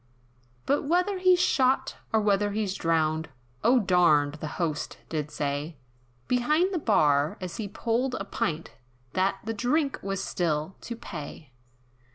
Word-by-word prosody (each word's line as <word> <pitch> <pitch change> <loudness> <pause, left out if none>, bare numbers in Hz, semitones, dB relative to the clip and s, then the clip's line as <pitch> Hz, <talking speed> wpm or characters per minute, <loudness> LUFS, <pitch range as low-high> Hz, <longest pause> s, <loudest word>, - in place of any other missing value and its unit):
But 280 - +2
whether 360 +6 +1
he's 365 -1 +5
shot, 265 -4 +2
or 220 - +3
whether 205 0 +2
he's 205 -3 -1
drowned, 160 -2 0 0.3
Or 250 +2 +5
darned, 170 -8 +4
the 155 - -3
Host 160 -4 -2
did 155 -2 -2
say, 145 +2 -3 0.5
Behind 305 +10 +2
the 350 - 0
bar, 150 - +3
as 180 -2 -6
he 215 - -3
pulled 235 +5 -1
a 195 - -4
pint, 165 -4 -2 0.4
That 190 +1 +1
"the 225 - -3
drink 275 +6 0
was 195 0 -3
still 160 0 -1
to 235 - -3
pay!" 155 - -8
195 Hz, 145 wpm, -27 LUFS, 160-250 Hz, 0.5 s, he's